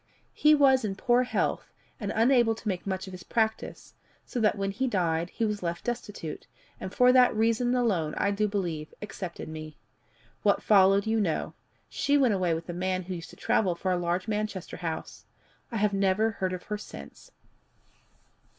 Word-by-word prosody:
He 305 0 +5
was 270 -3 +5
in 200 -3 -2
poor 245 +4 +3
health, 250 - -1 0.3
and 205 -2 -3
unable 235 0 +4
to 220 - -9
make 190 -1 -2
much 190 -1 -2
of 190 - -9
his 180 - -8
practice, 220 +3 -2 0.3
so 245 - -4
that 210 -2 +2
when 195 0 -1
he 260 +7 -1
died 170 -5 0
she 230 - +1
was 210 -1 -2
left 170 -1 -3
destitute, 210 -9 -5 0.3
and 185 - -6
for 250 +4 +5
that 250 -2 +5
reason 230 +3 +2
alone, 190 -11 0
I 200 - +1
do 210 +1 +1
believe, 170 -7 -3
accepted 185 -4 -6
me. 155 -1 -8 0.6
What - - +2
followed 195 -1 +5
you 220 0 +1
know: 170 -6 -1 0.3
she 285 0 +1
went 255 -6 +3
away 180 -4 +1
with 165 - -6
a 175 - -4
man 185 +1 -1
who 185 +1 -5
used 170 -2 -7
to - - -13
travel 185 -5 +1
for 185 +2 -2
a - - +2
large 175 +3 -1
Manchester 210 -3 -3
house. 165 -2 -5 0.5
I 230 - -2
have 210 -1 +1
never 195 +3 +2
heard 185 -3 -2
of 180 - -5
her 210 0 -4
since. - - -11
200 Hz, 185 wpm, -28 LUFS, 180-225 Hz, 0.6 s, He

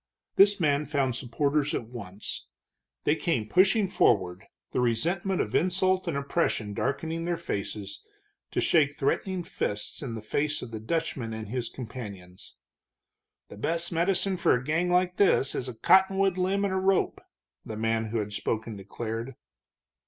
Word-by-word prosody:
This 200 +1 +6
man 150 -2 +2
found 135 -4 0
supporters 140 +4 0
at - - -2
once. 105 -4 -6 0.6
They 150 - +3
came 130 -10 -1
pushing 195 - +4
forward, 95 - +2 0.3
the - - 0
resentment 170 - +1
of 105 - -3
insult 185 +1 +2
and 160 -4 -1
oppression 140 -7 -1
darkening 160 +8 -2
their 175 0 0
faces, 100 -3 -5 0.5
to - - -2
shake 145 -3 +3
threatening 180 +6 -1
fists 105 -9 -3
in 125 -6 -4
the 110 - -7
faces 150 +7 -1
of 115 - -8
the 110 - -5
Dutchman 115 -2 -2
and 110 -2 -6
his 120 0 -2
companions. 100 -8 -9 0.9
"The - - -11
best 170 +9 -1
medicine 185 +3 +2
for 170 - +4
a 125 - -2
gang 160 +6 0
like 180 0 +2
this 185 -8 +3
is 130 - -3
a 125 - -7
cottonwood 190 +8 +4
limb 190 +2 +1
and 195 - -1
a - - +1
rope," 190 0 +1 0.4
the 110 - -6
man 115 0 0
who 110 +1 -3
had 105 -1 -3
spoken 110 +1 -2
declared. 115 +5 -5
140 Hz, 160 wpm, -28 LUFS, 110-180 Hz, 0.9 s, This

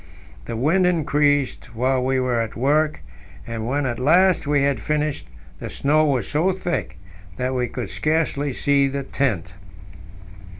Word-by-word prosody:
The - - -5
wind 165 +10 +2
increased 145 -7 +1
while 130 +2 +1
we 130 0 +1
were 125 -2 0
at 115 - -5
work, 150 +5 +1 0.4
and 115 -1 -5
when 140 +2 0
at 120 -2 -2
last 170 +5 +3
we 145 -1 +2
had 140 -2 +1
finished, 150 -1 -2 0.3
the - - -6
snow 150 +2 +2
was 135 -4 0
so 170 +6 +1
thick 175 - -3 0.4
that 130 +1 -1
we 125 -1 0
could 120 -5 -6
scarcely 155 -2 0
see 140 +1 +2
the 140 0 -3
tent. 110 - -2
140 Hz, 155 wpm, -22 LUFS, 125-150 Hz, 0.4 s, last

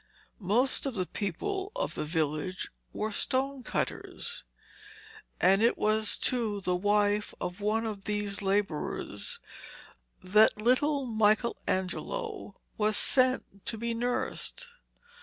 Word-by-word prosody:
Most 235 +8 +1
of 265 - -4
the 185 -2 -1
people 380 - -3
of - - -1
the - - -3
village 155 +3 -2 0.2
were 215 +1 -3
stone 270 +4 0
cutters, 470 - -3 1.0
and 190 +3 +5
it 235 +1 +3
was 215 0 +2
to 225 -5 +1
the 180 -2 0
wife 205 +2 +1
of 180 +3 -5
one 220 +2 +1
of 205 -3 -5
these 210 -1 -1
labourers 205 - -2 0.8
that 210 +3 +5
little 270 +5 +2
Michelangelo 220 - 0 0.2
was 215 0 +3
sent 255 -7 +2
to 225 - -1
be 235 +1 -2
nursed. 245 - -2
215 Hz, 115 wpm, -30 LUFS, 200-250 Hz, 1.0 s, and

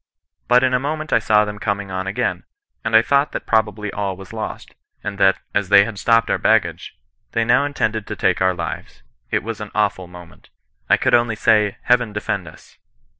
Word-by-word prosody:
But 125 +1 +4
in 130 -1 +2
a 125 - +3
moment 155 +3 -3
I - - +5
saw 105 -1 +3
them 105 0 -7
coming 100 -1 -3
on 95 0 -3
again, 120 +5 -2 0.4
and 110 0 0
I 110 - +7
thought 140 +3 +1
that - - -5
probably 105 -2 0
all 100 -2 -3
was 95 +2 -12
lost, 110 -1 -6 0.3
ana 100 - -5
that, 95 -1 +4 0.2
as 100 -2 -1
they 100 0 +7
had 105 -3 -7
stopped 115 0 +2
our - - 0
baggage, - - 0 0.4
they 115 0 +1
now 120 +4 +3
intended 110 -7 -2
to 105 - -5
take 95 -3 0
our 95 -1 +2
lives. 65 -6 -6 0.3
It - - -1
was 110 0 -6
an 105 - -6
awful 100 -4 0
moment. 90 0 -15 0.4
I - - +5
could - - 0
only 120 -2 +3
say, 105 -2 +2
* - - -41
Heaven 125 -3 +2
defend 100 -3 -3
us.' 75 - -16
105 Hz, 210 wpm, -20 LUFS, 100-115 Hz, 0.4 s, I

